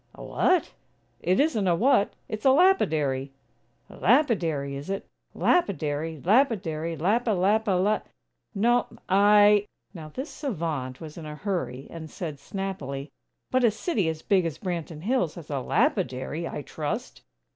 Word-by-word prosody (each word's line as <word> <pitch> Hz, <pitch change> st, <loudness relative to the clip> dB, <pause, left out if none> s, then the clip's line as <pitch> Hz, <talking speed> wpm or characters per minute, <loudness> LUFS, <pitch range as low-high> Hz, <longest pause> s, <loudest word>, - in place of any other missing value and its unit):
"A -, -, -10 dB
what?" 365 Hz, -2 st, +1 dB, 0.5 s
"It 185 Hz, -, +1 dB
isn't 255 Hz, -10 st, +2 dB
a 175 Hz, -, +4 dB
'what,' 240 Hz, +1 st, +3 dB
it's 215 Hz, -1 st, -5 dB
a 270 Hz, -, +6 dB
lapidary." 155 Hz, -, +3 dB, 0.5 s
"Lapidary, 175 Hz, -, +1 dB
is 140 Hz, +5 st, -7 dB
it? 195 Hz, 0 st, -3 dB, 0.3 s
Lapidary, 160 Hz, -, 0 dB
lapidary, 185 Hz, -, +1 dB
lapi 215 Hz, -, +1 dB
lapi 210 Hz, +3 st, +2 dB
la. 195 Hz, +4 st, +2 dB, 0.5 s
No, 240 Hz, +3 st, +3 dB, 0.2 s
I 205 Hz, +1 st, +5 dB
" -, -, -47 dB
Now 160 Hz, -4 st, -9 dB
this 265 Hz, -, -6 dB
savant 160 Hz, -, -4 dB
was 160 Hz, +1 st, -8 dB
in 155 Hz, -, -8 dB
a 150 Hz, -, -6 dB
hurry, 150 Hz, -, -3 dB
and 160 Hz, -2 st, -8 dB
said, 155 Hz, -5 st, -6 dB
snappily: 145 Hz, -6 st, -5 dB, 0.4 s
"But 255 Hz, 0 st, +2 dB
a 235 Hz, -, +6 dB
city 215 Hz, -, -1 dB
as 160 Hz, -1 st, -5 dB
big 195 Hz, -3 st, +3 dB
as 160 Hz, -, -5 dB
Branton 170 Hz, -4 st, -4 dB
Hills 205 Hz, -5 st, 0 dB
has 160 Hz, -3 st, -10 dB
a 140 Hz, -, -1 dB
lapidary, 130 Hz, +5 st, 0 dB
I 145 Hz, -, -5 dB
trust!" 185 Hz, -, -5 dB
180 Hz, 145 wpm, -26 LUFS, 155-215 Hz, 0.5 s, a